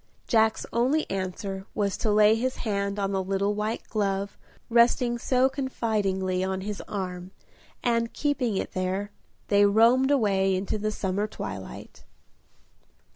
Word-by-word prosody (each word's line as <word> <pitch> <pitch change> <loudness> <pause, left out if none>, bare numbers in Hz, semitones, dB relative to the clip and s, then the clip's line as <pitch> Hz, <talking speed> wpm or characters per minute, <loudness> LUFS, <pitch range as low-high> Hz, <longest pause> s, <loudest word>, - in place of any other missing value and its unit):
Jack's 220 -2 +2
only 260 +7 +2
answer 190 +1 -4
was 200 -2 0
to 220 - 0
lay 210 +1 +6
his 255 +3 -1
hand 200 -2 -2
on 195 -1 -1
the 190 -1 0
little 195 +2 0
white 210 +2 -2
glove 200 -2 -1 0.3
resting 240 +1 +3
so 255 +2 +3
confidingly 210 -9 -1
on 190 0 -2
his 205 0 -5
arm, 180 -2 -5 0.5
and, 230 -1 +1
keeping 260 -8 -1
it - - -3
there, 190 +2 -2 0.4
they 205 0 +5
roamed 230 +6 +5
away 195 -8 +2
into 195 +3 -2
the 215 +1 -1
summer 205 0 -2
twilight. - - -8
205 Hz, 135 wpm, -26 LUFS, 195-230 Hz, 0.5 s, lay